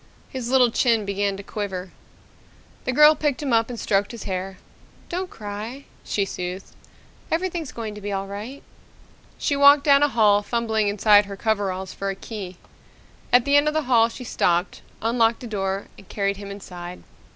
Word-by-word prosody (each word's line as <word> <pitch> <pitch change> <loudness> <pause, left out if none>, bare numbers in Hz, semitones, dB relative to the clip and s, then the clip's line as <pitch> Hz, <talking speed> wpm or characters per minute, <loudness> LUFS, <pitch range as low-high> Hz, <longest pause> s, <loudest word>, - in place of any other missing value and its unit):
His 255 -3 -5
little 255 -2 +4
chin 230 -3 +2
began 200 0 -1
to 200 - -8
quiver. 190 -3 -5 0.9
The - - 0
girl 300 +4 +7
picked 295 -2 -1
him 270 -4 0
up 225 +1 +3
and 240 -2 -6
stroked 200 0 +1
his 235 -3 -8
hair. 190 0 -4 0.5
"Don't 365 +1 -3
cry," 215 +6 -7 0.2
she 200 - -1
soothed. 180 0 -6 0.6
"Everything's 335 -3 -2
going 220 -2 -6
to 210 - -10
be 205 0 -4
all 195 0 -2
right." 210 +8 -8 0.7
She 285 - 0
walked 280 0 +7
down 280 -1 +5
a 290 - +5
hall, 210 -6 +4
fumbling 220 -1 0
inside 205 0 +5
her 200 0 -8
coveralls 195 -4 -1
for 195 - -3
a 195 - -3
key. 195 -4 -8 0.7
At 245 -1 +5
the 280 0 +3
end 290 +1 +5
of 300 - 0
the 310 - +1
hall 235 -3 +4
she 250 - -9
stopped, 175 -6 0 0.2
unlocked 230 0 +2
a - - -5
door, 195 -2 -2
and 195 - -17
carried 200 -1 -1
him 200 0 -8
inside. 180 -3 -9
215 Hz, 180 wpm, -23 LUFS, 195-255 Hz, 0.9 s, girl